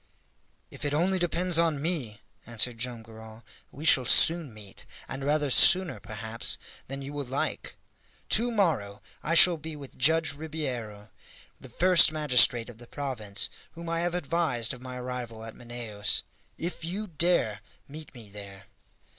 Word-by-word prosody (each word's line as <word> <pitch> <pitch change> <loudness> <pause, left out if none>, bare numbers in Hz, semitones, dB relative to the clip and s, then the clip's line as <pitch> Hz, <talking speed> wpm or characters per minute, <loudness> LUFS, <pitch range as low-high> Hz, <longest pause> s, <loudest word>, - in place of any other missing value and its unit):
"If - - -11
it 145 0 -1
only 185 +4 +1
depends 175 0 0
on 165 -4 +1
me," 140 - -4 0.3
answered 115 0 -2
Joam 120 -1 -5
Garral, 110 0 -13 0.3
"we 150 +4 -9
shall 135 -4 +5
soon 160 +2 +6
meet, 105 -3 -15 0.2
and 135 +1 -6
rather 145 0 0
sooner, 180 - +5
perhaps, 110 +3 -5 0.3
than 135 +1 -7
you 140 +2 -8
will 145 -1 -4
like. 130 +3 -4 0.5
To 235 +3 +3
morrow 155 - -1 0.2
I 165 - -1
shall 170 0 +7
be 160 0 -8
with 140 -3 -12
Judge 160 +3 +2
Ribeiro, 130 -9 -6 0.5
the 130 - -13
first 180 +6 +4
magistrate 125 -6 +3
of 120 -2 -12
the 120 - -13
province, 120 -9 -2 0.3
whom 170 0 -8
I 165 0 -1
have 175 0 -1
advised 155 -8 -1
of 125 - -12
my 130 0 -8
arrival 125 -3 -6
at 115 0 -9
Manaos. 115 -4 -2 0.3
If 170 0 -5
you 190 +6 -4
dare, 160 - 0 0.3
meet 150 0 -11
me 110 -4 -13
there!" 100 -1 -11
135 Hz, 155 wpm, -27 LUFS, 115-165 Hz, 0.5 s, shall